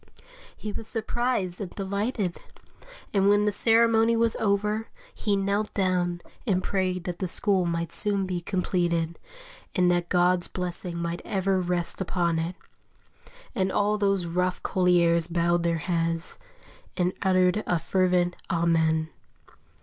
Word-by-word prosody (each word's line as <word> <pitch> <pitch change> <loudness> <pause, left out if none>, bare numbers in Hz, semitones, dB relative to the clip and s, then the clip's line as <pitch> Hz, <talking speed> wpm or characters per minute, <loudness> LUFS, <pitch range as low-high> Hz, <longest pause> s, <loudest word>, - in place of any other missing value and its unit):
He 210 - -5
was 220 - -6
surprised 225 -5 -2
and 195 - -4
delighted; 200 -1 -2 0.7
and 195 -1 +3
when 205 0 +4
the 210 - +2
ceremony 230 +1 +4
was 230 0 +2
over, 210 +1 0 0.3
he 205 -2 0
knelt 200 +2 0
down 180 -3 0 0.3
and 185 -3 +1
prayed 185 -2 -1
that 175 -1 -5
the 185 - -1
school 190 -1 +2
might 170 0 -2
soon 200 -2 +1
be 180 -2 -3
completed, 170 -3 -1 0.6
and 180 -2 +4
that 175 -1 0
God's 180 0 +2
blessing 180 -1 -4
might 170 0 -3
ever 195 -1 0
rest 175 0 -2
upon 170 -3 0
it; 170 +3 -3 1.0
and 190 -5 0
all 210 +1 +1
those 195 -3 +1
rough 180 +2 -1
colliers 170 -2 +3
bowed 175 0 +1
their 170 -1 +1
heads, 165 +1 -2 0.6
and 180 0 +1
uttered 185 +1 +3
a 175 - +2
fervent 180 +1 +1
"Amen." 160 -2 +1
180 Hz, 135 wpm, -26 LUFS, 175-200 Hz, 1.0 s, when